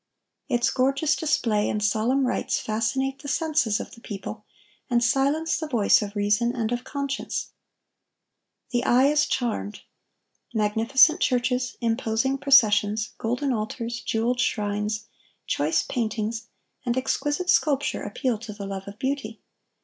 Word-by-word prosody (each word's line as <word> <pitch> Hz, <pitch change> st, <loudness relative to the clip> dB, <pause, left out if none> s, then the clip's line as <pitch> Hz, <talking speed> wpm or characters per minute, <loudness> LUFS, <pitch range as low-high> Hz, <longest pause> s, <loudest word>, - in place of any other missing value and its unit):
Its 240 Hz, 0 st, +2 dB
gorgeous 275 Hz, +4 st, +1 dB
display 225 Hz, -9 st, +1 dB
and 210 Hz, 0 st, -1 dB
solemn 225 Hz, +6 st, +2 dB
rites 250 Hz, -, 0 dB
fascinate 265 Hz, +5 st, -1 dB
the -, -, -8 dB
senses 295 Hz, -8 st, +1 dB
of -, -, -7 dB
the 230 Hz, -, -14 dB
people, 210 Hz, +1 st, -7 dB, 0.4 s
and 240 Hz, -1 st, +2 dB
silence 280 Hz, +6 st, +1 dB
the 315 Hz, -, -4 dB
voice 235 Hz, -8 st, +4 dB
of 205 Hz, 0 st, -5 dB
reason 210 Hz, +4 st, +1 dB
and 230 Hz, -2 st, -1 dB
of 245 Hz, 0 st, -2 dB
conscience. 280 Hz, -1 st, -4 dB, 1.2 s
The 245 Hz, -1 st, 0 dB
eye 255 Hz, +2 st, +4 dB
is 295 Hz, 0 st, +2 dB
charmed. 225 Hz, -4 st, -2 dB, 0.7 s
Magnificent 225 Hz, +8 st, +4 dB
churches, 250 Hz, 0 st, 0 dB
imposing 230 Hz, +3 st, 0 dB
processions, 215 Hz, -6 st, +4 dB
golden 245 Hz, +4 st, -1 dB
altars, 230 Hz, +2 st, -4 dB
jeweled 235 Hz, +3 st, 0 dB
shrines, 210 Hz, 0 st, -1 dB, 0.4 s
choice 150 Hz, +3 st, +1 dB
paintings, 225 Hz, -1 st, -3 dB, 0.4 s
and 240 Hz, -1 st, -1 dB
exquisite 290 Hz, +6 st, 0 dB
sculpture 285 Hz, -2 st, +1 dB
appeal 250 Hz, -6 st, -2 dB
to 220 Hz, -1 st, -8 dB
the 200 Hz, -1 st, -7 dB
love 195 Hz, 0 st, -6 dB
of 200 Hz, +1 st, -9 dB
beauty. 260 Hz, -4 st, -3 dB
235 Hz, 135 wpm, -25 LUFS, 215-270 Hz, 1.2 s, voice